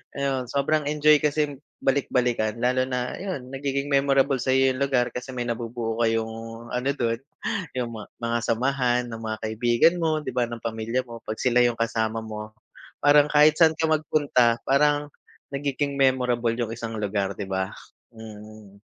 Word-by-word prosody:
ayun 135 -2 -1
sobrang 150 +2 +1
enjoy 150 0 +5
kasi 150 -1 +1 0.3
balik-balikan 125 -5 +1
lalo 125 +1 +2
na 125 -1 -2
yun 180 -10 -5
nagiging 140 +1 -2
memorable 140 0 +3
sayo 130 +1 +3
yung 130 - -5
lugar 130 -3 +2
kasi 125 +1 -5
may 120 - -2
nabubuo 115 -1 -3
kayong 115 +1 -2
ano 125 +2 -1
dun 115 -3 -1 0.6
yung 125 -2 -2 0.3
mga 115 0 -1
samahan 125 +1 +1
ng 115 -1 -7
mga 110 -1 -3
kaibigan 120 +8 +3
mo, 160 -2 +1
di 130 -4 -6
ba 125 - +2
ng 120 0 -7
pamilya 115 +3 -2
mo, 115 -1 -10
pag 110 -1 -5
sila 125 -1 +3
yung 120 -1 +1
kasama 115 -1 0
mo, 110 -1 -7 0.5
parang 145 0 +5
kahit 150 +1 +6
saan 160 -1 +6
ka 160 +1 0
magpunta 145 -6 +2
parang 145 +2 +3 0.4
nagiging 140 0 -2
memorable 125 -3 +2
yung 115 -2 -2
isang 115 -1 -5
lugar 100 -1 -1
di 100 - -4
ba? 95 0 -2 0.4
Mm. 110 -2 -12
125 Hz, 160 wpm, -25 LUFS, 115-140 Hz, 0.6 s, kahit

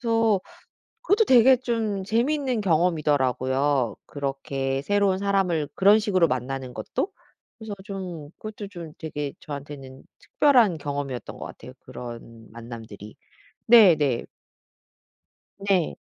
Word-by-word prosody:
그래서 225 -4 +2 0.6
그것도 445 -2 +3
되게 255 +1 +7
좀 225 -5 -2
재밌는 250 +1 0
경험이더라고요, 145 - +1
그렇게 135 -1 -3
새로운 200 +1 +1
사람을 190 -7 0
그런 205 +3 +5
식으로 185 -6 +2
만나는 130 0 -4
것도. 380 - -3 0.5
그래서 220 -2 -7
좀 180 -7 -7
그것도 215 -1 -7
좀 170 -5 -9
되게 150 -3 -4
저한테는 140 -2 -9 0.2
특별한 240 - +3
경험이었던 140 -3 -5
것 - - -7
같아요, - - -11
그런 115 -2 -10
만남들이. 115 -3 -10 0.5
네네. 160 - +5 1.3
네. 195 -4 +1
165 Hz, 270 characters per minute, -25 LUFS, 135-210 Hz, 1.3 s, 되게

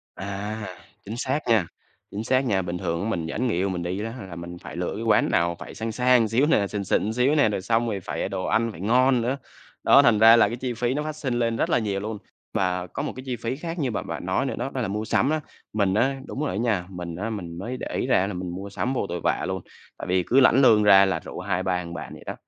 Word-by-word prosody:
À, 100 +2 -5 0.4
chính 105 - -6
xác 135 +3 0
nha, 110 -7 +3 0.4
chính 105 +2 -4
xác 130 +2 +2
nha, 100 -6 +1
bình 90 0 -4
thường 85 -1 -2
á 110 - -1
mình 85 -7 -2
dẫn 115 +10 -2
người 115 - 0
yêu 95 +3 0
mình 90 -2 -3
đi 90 +3 -3
đó 115 - -3
ha, 115 -4 -8
là 90 -3 -9
mình 85 +1 -7
phải - - -9
lựa 90 +1 -2
cái 110 - -4
quán 110 -2 +3
nào 85 0 +2
phải - - -9
sang 115 0 -3
sang 125 0 +3
xíu 115 +6 +2
nè, 105 -11 +3
xịn 100 0 -3
xịn 105 +3 0
xíu 125 +5 +2
nè, 145 -7 +4
rồi 100 - -2
xong 115 +3 +1
rồi 100 -3 -2
phải, - - -5
ờ, - - 0
đồ - - -3
ăn 115 0 +1
phải 85 - -11
ngon 125 +4 +3
nữa. 125 +4 -1 0.5
Đó, - - +7
thành 110 -3 +4
ra 115 +1 +9
là 115 - +5
cái 115 - -3
chi 125 -1 -3
phí 120 +2 -1
nó 150 +2 -1
phát 155 0 -4
sinh 135 -5 -3
lên 115 -1 0
rất - - 0
là - - +3
nhiều 100 -3 -2
luôn. 110 +1 -4 0.4
Và 90 -1 0
có 140 - -5
một - - -3
cái 130 - -8
chi 125 -2 -2
phí 115 +2 -3
khác 165 +4 -5
như 135 -5 0
mà 110 - -2
bạn - - -6
nói - - 0
nữa - - -2
đó, - - -2
đó 130 - -2
là 110 - -1
mua 105 +2 -3
sắm 130 - +2
á. 155 0 0 0.3
Mình 100 -3 +1
á 135 +6 +2
đúng - - -6
rồi 150 - 0
á - - -3
nha, 105 -5 0
mình 90 -3 -6
á 105 +6 -3
mình 90 -6 -6
mới 120 +8 -5
để - - -5
ý - - -1
ra 95 - +3
là 105 - -4
mình 90 0 -4
mua 95 +3 -6
sắm 125 +6 -2
vô 125 - -1
tội 85 - -3
vạ - - +1
luôn, 95 -1 -3 0.4
tại - - -6
vì 90 0 +2
cứ 130 - +3
lãnh 130 0 +6
lương 110 -5 +6
ra 100 -1 +7
là 95 - 0
rủ - - -8
2, 90 - -1
3 95 -1 0
thằng 85 -1 -6
bạn - - -7
vậy - - -12
đó, - - -4
110 Hz, 300 wpm, -25 LUFS, 95-125 Hz, 0.5 s, ra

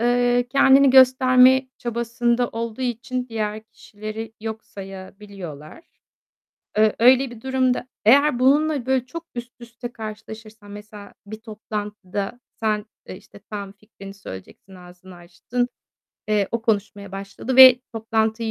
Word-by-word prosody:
eee, 245 +1 +2
kendini 270 +1 +5
gösterme 260 0 +5
çabasında 235 +1 -1
olduğu 230 +2 -5
için 250 +1 -3
diğer 215 -1 -4
kişileri 215 0 -9
yok 220 0 -6
sayabiliyorlar. 190 - -10 1.0
Eee, 215 0 +3
öyle 255 +2 +5
bir 225 -2 -12
durumda 260 -1 0 0.2
Eğer 280 +3 +5
bununla 285 +1 +2
böyle 260 -1 0
çok 335 +6 -8
üst 240 0 -7
üste 235 +1 -9
karşılaşırsan, 220 -1 -10
mesela 205 0 -11
bir 215 +2 -8
toplantıda, 210 -1 -6 0.2
sen, 215 -2 -1 0.2
e, - - -9
işte, 200 - -17
tam 200 -2 -6
fikrini 200 -1 -13
söyleyeceksin, 190 - -12
ağzını 180 0 -15
açtın. 175 +8 -4 0.6
Eee, 210 -2 +1
o 230 -1 -3
konuşmaya 205 -2 -2
başladı 195 +6 -5
ve 255 -1 +10
toplantıyı 225 0 -1
225 Hz, 125 wpm, -22 LUFS, 205-250 Hz, 1.0 s, ve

